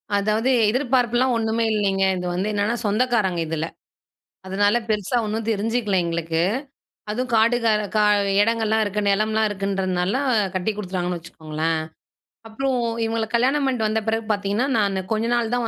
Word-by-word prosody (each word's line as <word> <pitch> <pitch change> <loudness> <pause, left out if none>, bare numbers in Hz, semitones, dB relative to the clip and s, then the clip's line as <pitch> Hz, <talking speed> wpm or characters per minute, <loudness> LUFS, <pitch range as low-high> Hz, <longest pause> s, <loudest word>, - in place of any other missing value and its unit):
அதாவது, 215 +4 +1 0.2
எதிர்பார்ப்புலாம் 250 0 +1
ஒண்ணுமே 225 +1 0
இல்லைங்க. 195 -2 +1
இது 180 - -4
வந்து 185 +3 -1
என்னென்னா 205 +3 0
சொந்தக்காரங்க 210 -4 +1
இதுல. 160 0 -2 0.8
அதனால 205 +4 +2
பெருசா 215 +3 0
ஒண்ணும் 215 +1 -3
தெரிஞ்சுக்கல 215 -1 0
எங்களுக்கு. 165 -1 -1 0.7
அதுவும் 250 +3 -2
காடு 230 +2 +4
க 230 - +2 0.3
க - - +4 0.4
இடங்கள்லாம் 220 0 +1
இருக்கு 210 0 -2
நிலம்லாம் 215 +2 +2
இருக்குன்றதுனால 195 0 -1 0.4
கட்டி 185 +4 0
கொடுத்துட்டாங்கன்னு 180 -4 -3
வச்சுக்கோங்களேன். 160 -1 -3 0.7
அப்புறம் 260 +4 -1 0.3
இவங்கள 225 0 -1
கல்யாணம் 265 +5 +2
பண்ணிட்டு 245 -5 0
வந்த 220 +1 0
பிறகு 225 0 0
பாத்தீங்கன்னா, 205 +4 0
நான் 200 -3 +1
கொஞ்ச 220 +1 0
நாள் 235 -1 0
தான் 240 -2 -1
215 Hz, 140 wpm, -22 LUFS, 195-230 Hz, 0.8 s, காடு